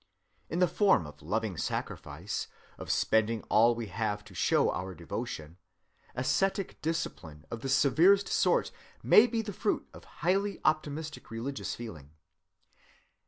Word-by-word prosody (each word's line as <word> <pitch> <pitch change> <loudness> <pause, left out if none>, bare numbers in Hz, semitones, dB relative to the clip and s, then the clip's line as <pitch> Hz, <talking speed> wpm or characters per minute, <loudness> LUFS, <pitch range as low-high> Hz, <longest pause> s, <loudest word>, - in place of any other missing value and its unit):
In 165 - -2
the 180 0 +4
form 190 - +3
of 75 +1 -12
loving 105 +3 -2
sacrifice, - - -4 0.3
of - - -8
spending 110 0 +2
all 115 +2 +5
we 115 0 -4
have 105 +1 -2
to 105 - -15
show 85 - +2
our 95 +1 -5
devotion, 80 +1 -6 0.6
ascetic 195 +9 0
discipline 80 - -4
of 115 - -5
the 135 - -3
severest 165 +10 +5
sort - - +2 0.3
may 230 - +7
be 225 -1 -1
the 210 -2 -5
fruit 210 - -1
of - - -13 0.2
highly 195 +2 +1
optimistic 155 0 -1
religious 120 +5 -4
feeling. 80 -12 -9
120 Hz, 135 wpm, -30 LUFS, 105-175 Hz, 0.6 s, may